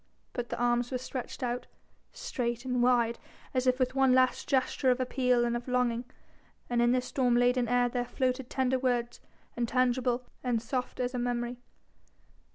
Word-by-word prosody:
But 245 Hz, -1 st, -4 dB
the 240 Hz, -, -3 dB
arms 240 Hz, 0 st, +1 dB
were 255 Hz, -, -1 dB
stretched 255 Hz, 0 st, -6 dB
out, 245 Hz, 0 st, -2 dB, 0.4 s
straight 240 Hz, -, -3 dB
and 250 Hz, -1 st, 0 dB
wide, 240 Hz, -2 st, +3 dB, 0.3 s
as 255 Hz, -1 st, 0 dB
if 255 Hz, 0 st, +4 dB
with 255 Hz, -1 st, 0 dB
one 270 Hz, -1 st, +4 dB
last 255 Hz, 0 st, +2 dB
gesture 265 Hz, 0 st, +2 dB
of 250 Hz, 0 st, +3 dB
appeal 250 Hz, -1 st, +2 dB
and 235 Hz, 0 st, 0 dB
of 240 Hz, +1 st, -5 dB
longing, 250 Hz, -1 st, 0 dB, 0.7 s
and 240 Hz, 0 st, +2 dB
in 240 Hz, 0 st, +4 dB
this 250 Hz, 0 st, +1 dB
storm 250 Hz, -3 st, +1 dB
laden 245 Hz, 0 st, +3 dB
air 245 Hz, +1 st, +3 dB
there 245 Hz, 0 st, -1 dB
floated 255 Hz, 0 st, -1 dB
tender 260 Hz, -1 st, +1 dB
words, 245 Hz, -2 st, -1 dB, 0.4 s
intangible 245 Hz, +1 st, +1 dB, 0.2 s
and 245 Hz, -3 st, +1 dB
soft 250 Hz, +3 st, -4 dB
as 250 Hz, 0 st, -1 dB
a 250 Hz, -, -2 dB
memory. 240 Hz, 0 st, -2 dB
250 Hz, 170 wpm, -30 LUFS, 240-255 Hz, 0.7 s, if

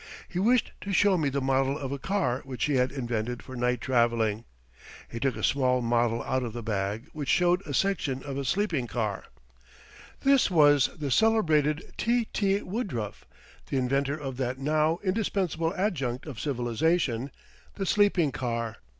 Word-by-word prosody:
He 180 Hz, -, -4 dB
wished 235 Hz, +5 st, +3 dB
to 200 Hz, -, -5 dB
show 195 Hz, 0 st, +4 dB
me 155 Hz, -5 st, +1 dB
the 140 Hz, +1 st, -2 dB
model 135 Hz, +1 st, +1 dB
of 135 Hz, -3 st, -5 dB
a 140 Hz, -, -3 dB
car 135 Hz, -7 st, -1 dB
which 130 Hz, -2 st, -3 dB
he 150 Hz, -, 0 dB
had 125 Hz, -1 st, +2 dB
invented 120 Hz, -3 st, -3 dB
for 130 Hz, -, -9 dB
night 125 Hz, -1 st, 0 dB
traveling. 115 Hz, -3 st, +1 dB, 0.6 s
He 115 Hz, -, -6 dB
took 135 Hz, +1 st, 0 dB
a -, -, -6 dB
small 130 Hz, -2 st, +2 dB
model 115 Hz, 0 st, +1 dB
out 130 Hz, 0 st, 0 dB
of 120 Hz, -3 st, -4 dB
the 120 Hz, -1 st, -6 dB
bag, 105 Hz, +3 st, -2 dB
which 145 Hz, -3 st, -4 dB
showed 180 Hz, +1 st, +3 dB
a 145 Hz, -, -4 dB
section 155 Hz, -9 st, 0 dB
of 140 Hz, -2 st, -5 dB
a 140 Hz, -, -2 dB
sleeping 165 Hz, -4 st, 0 dB
car. 110 Hz, -5 st, -3 dB, 1.0 s
This 275 Hz, -4 st, +4 dB
was 145 Hz, -5 st, +5 dB
the 145 Hz, -4 st, -3 dB
celebrated 160 Hz, -, +2 dB
T.T. 215 Hz, -3 st, +1 dB
Woodruff, 180 Hz, -, -4 dB, 0.4 s
the 135 Hz, -, 0 dB
inventor 135 Hz, +3 st, 0 dB
of 135 Hz, -4 st, -6 dB
that 130 Hz, -1 st, -2 dB
now 155 Hz, +4 st, +1 dB
indispensable 185 Hz, -5 st, 0 dB
adjunct 140 Hz, -, -1 dB
of 140 Hz, -9 st, -7 dB
civilization 130 Hz, -, 0 dB, 0.5 s
the 195 Hz, -, -3 dB
sleeping 190 Hz, -6 st, +3 dB
car. 115 Hz, -3 st, -3 dB
140 Hz, 165 wpm, -27 LUFS, 120-175 Hz, 1.0 s, was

